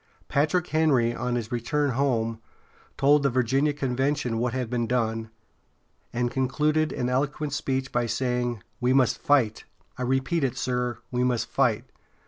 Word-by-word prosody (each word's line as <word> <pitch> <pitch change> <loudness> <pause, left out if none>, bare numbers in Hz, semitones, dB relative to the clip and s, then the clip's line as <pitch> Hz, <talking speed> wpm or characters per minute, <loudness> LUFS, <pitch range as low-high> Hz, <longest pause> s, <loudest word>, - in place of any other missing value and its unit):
Patrick 155 +5 +1
Henry, 140 -8 +2
on 125 -1 -2
his 120 -1 -3
return 135 +4 0
home, 115 -4 0 0.6
told 145 +2 +5
the 140 - +2
Virginia 130 +4 +2
convention 135 -2 -1
what 120 +1 0
had 130 -1 -2
been 120 0 -1
done, 115 -2 -1 0.8
and 120 0 -1
concluded 150 +4 +1
an 125 - -2
eloquent 145 +3 -1
speech 130 -2 -2
by 120 -1 0
saying: 125 -2 -1 0.2
"We 125 0 +2
must 130 -3 +3
fight! 125 -7 +2 0.4
I - - -3
repeat 135 +6 0
it, 130 -3 -1
sir, 125 -1 -1
we 125 0 0
must 125 -2 +1
fight! - - +1
125 Hz, 150 wpm, -26 LUFS, 120-140 Hz, 0.8 s, told